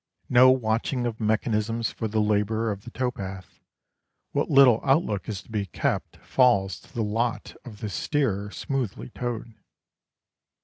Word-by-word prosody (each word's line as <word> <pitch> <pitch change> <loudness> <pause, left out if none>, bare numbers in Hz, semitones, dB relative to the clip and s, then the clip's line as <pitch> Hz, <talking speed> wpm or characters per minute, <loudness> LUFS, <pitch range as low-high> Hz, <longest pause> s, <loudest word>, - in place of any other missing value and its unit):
No 125 +1 +7
watching 120 0 +1
of 115 -2 -3
mechanisms 110 +1 0
for 110 - -3
the 110 +1 -1
labourer 105 +1 +1
of 100 +2 -7
the - - -7
tow 125 0 -1
path. 95 -4 -8 0.7
What - - -1
little 135 -5 +6
outlook 135 - +1
is 100 -1 -4
to - - -18
be 105 -2 -2
kept - - -2
falls 100 -7 +3
to - - -20
the 115 - -2
lot 115 +3 -2
of 110 -4 -11
the 110 - -3
steerer 105 - -1
smoothly 125 -1 -4
towed. 120 -2 -5
115 Hz, 150 wpm, -26 LUFS, 105-125 Hz, 0.7 s, No